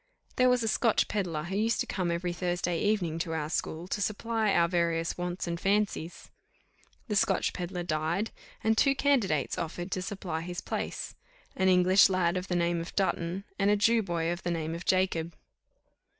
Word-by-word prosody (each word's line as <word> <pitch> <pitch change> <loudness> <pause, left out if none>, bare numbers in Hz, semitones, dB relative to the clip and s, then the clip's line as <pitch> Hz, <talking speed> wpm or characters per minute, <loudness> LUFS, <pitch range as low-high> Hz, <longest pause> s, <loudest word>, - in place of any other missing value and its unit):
There 255 0 +4
was 250 -1 +2
a - - 0
Scotch 225 0 +2
pedlar, 175 -7 -2
who 180 +4 -4
used 225 +3 +1
to - - -1
come 180 -3 -2
every 170 +1 -1
Thursday 175 -1 -1
evening 185 -6 0
to 165 -1 -2
our 155 -1 -3
school 165 +1 -3
to 205 - -2
supply 220 +1 0
our 170 -3 +4
various 170 -1 0
wants 175 0 -3
and 170 -1 -3
fancies. 195 -4 -1 0.8
The 210 - -1
Scotch 195 - +2
pedlar 180 0 -4
died, 170 +5 -1 0.3
and 220 0 +3
two 275 +4 +3
candidates 235 - +1
offered 175 +3 -4
to 185 - -1
supply 185 -5 -4
his 175 +1 -5
place, - - -4 0.4
an 190 0 +2
English 185 +2 +6
lad 185 -2 +1
of 185 +1 -3
the 180 - -1
name 170 -1 +1
of 170 - -8
Dutton, 190 -1 -1 0.2
and 200 0 +3
a 210 - +5
Jew 225 +2 +4
boy 170 -4 -1
of 175 - -4
the - - -3
name 165 -2 -2
of 170 +1 -6
Jacob. 180 -3 +1
180 Hz, 190 wpm, -29 LUFS, 170-205 Hz, 0.8 s, English